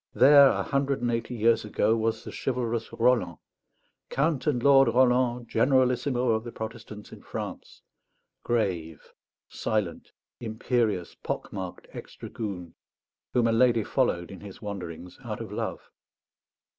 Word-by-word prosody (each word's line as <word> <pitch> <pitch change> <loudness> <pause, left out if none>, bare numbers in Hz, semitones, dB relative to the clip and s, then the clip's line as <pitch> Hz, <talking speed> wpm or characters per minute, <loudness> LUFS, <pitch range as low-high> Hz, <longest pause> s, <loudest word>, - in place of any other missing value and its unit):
There, 140 +2 +8
a - - 0
hundred 140 -2 -1
and 120 - +1
eighty 115 +1 -3
years 115 0 +3
ago, 105 +1 +1
was 115 0 -1
the - - -8
chivalrous 120 -3 -2
Roland, 115 -8 +1 0.7
"Count 140 -1 0
and 125 -5 +1
Lord 135 -2 +6
Roland, 125 0 +2
generalissimo 125 +1 +2
of 110 -1 +1
the 120 - -7
Protestants 110 -2 -8
in - - -11
France," - - -7 0.6
grave, 90 -9 -2 0.3
silent, 105 -6 -3 0.3
imperious, 110 - -1
pock - - -5
marked 95 -3 -6
ex - - -10
dragoon, 90 -6 -6 0.6
whom 120 -2 +3
a 115 - +3
lady 115 -1 +3
followed 95 -11 0
in 95 - -9
his 100 -2 -11
wanderings 90 -4 -7
out - - -5
of - - -7
love. - - -5
115 Hz, 135 wpm, -27 LUFS, 105-125 Hz, 0.7 s, There